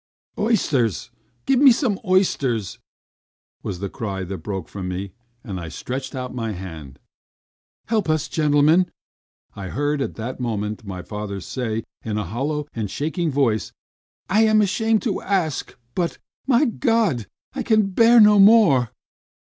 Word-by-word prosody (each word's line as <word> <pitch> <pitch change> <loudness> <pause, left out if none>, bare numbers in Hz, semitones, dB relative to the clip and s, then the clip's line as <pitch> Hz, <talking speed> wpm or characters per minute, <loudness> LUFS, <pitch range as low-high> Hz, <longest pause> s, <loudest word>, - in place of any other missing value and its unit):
"Oysters! 150 - 0 0.3
Give 270 -2 +3
me 275 -1 +8
some 230 -5 0
oysters!" 135 - +1 0.8
was 95 - -4
the 100 - -2
cry 100 -3 -4
that 95 +1 -6
broke 95 -5 -5
from 95 -2 -6
me 95 +2 -4 0.3
and 95 -5 -5
I 85 -2 -6
stretched 130 - -5
out 125 -1 -5
my 115 -3 -3
hand. 80 -8 -9 0.9
"Help 215 -7 0
us, 155 -2 +1
gentlemen!" 155 +3 +3 0.7
I 100 -2 -6
heard 145 +4 -1
at - - -3
that 120 +4 -5
moment 110 -3 -3
my 95 -3 -7
father 105 -2 -5
say, 115 +2 -3 0.2
in 110 -1 -3
a 105 - -1
hollow 145 - -3
and 110 -3 -3
shaking 160 - -2
voice. 130 -7 0 0.5
"I 215 +4 +4
am 215 0 +4
ashamed 220 +2 +1
to 215 -6 -1
ask 180 -7 -2 0.2
but 175 -2 -1 0.3
my 265 +2 +4
God! 225 - +1 0.3
I 270 - -3
can 215 -4 +2
bear 230 +4 +6
no 210 -1 +7
more!" 195 - +6
135 Hz, 145 wpm, -22 LUFS, -, 0.9 s, me